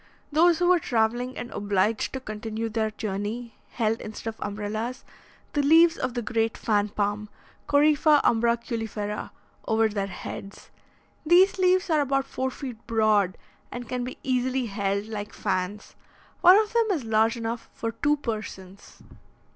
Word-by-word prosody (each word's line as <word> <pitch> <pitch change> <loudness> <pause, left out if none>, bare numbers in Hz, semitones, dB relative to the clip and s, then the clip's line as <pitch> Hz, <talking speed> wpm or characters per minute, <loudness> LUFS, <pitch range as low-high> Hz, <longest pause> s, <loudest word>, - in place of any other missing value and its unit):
Those 335 +3 +4
who 355 - +1
were 365 -1 +5
travelling 240 0 0
and 245 - -6
obliged 205 +2 0
to 265 - -3
continue 220 -1 -5
their 220 0 0
journey, 215 +3 -4 0.2
held, 225 -1 0
instead 220 +1 -6
of - - -24
umbrellas, 215 +5 -4 0.5
the 290 - +2
leaves 325 +4 +6
of 255 -5 -3
the 240 - -2
great 225 +1 -1
fan 210 -1 +1
palm 210 +1 -2 0.4
(Corypha 300 +1 +5
umbraculifera) 225 -2 -1 0.4
over 220 0 +3
their 200 -2 -2
heads. 195 +1 -9 0.5
These 360 +4 +5
leaves 370 -1 +3
are 310 -2 +4
about 275 -1 0
four 260 -1 -2
feet 255 -3 -8
broad, 215 -5 +2 0.3
and 245 -1 -6
can 250 0 -3
be 250 - -6
easily 255 0 0
held, 200 -1 -1
like 210 -1 -6
fans. 195 +1 -3 0.5
One 365 +3 +8
of 430 0 +1
them 465 -1 +3
is 305 -8 -2
large 220 +1 +2
enough 230 0 -4
for 230 - -4
two 295 +6 +1
persons. 215 -6 -7
230 Hz, 150 wpm, -26 LUFS, 210-265 Hz, 0.5 s, One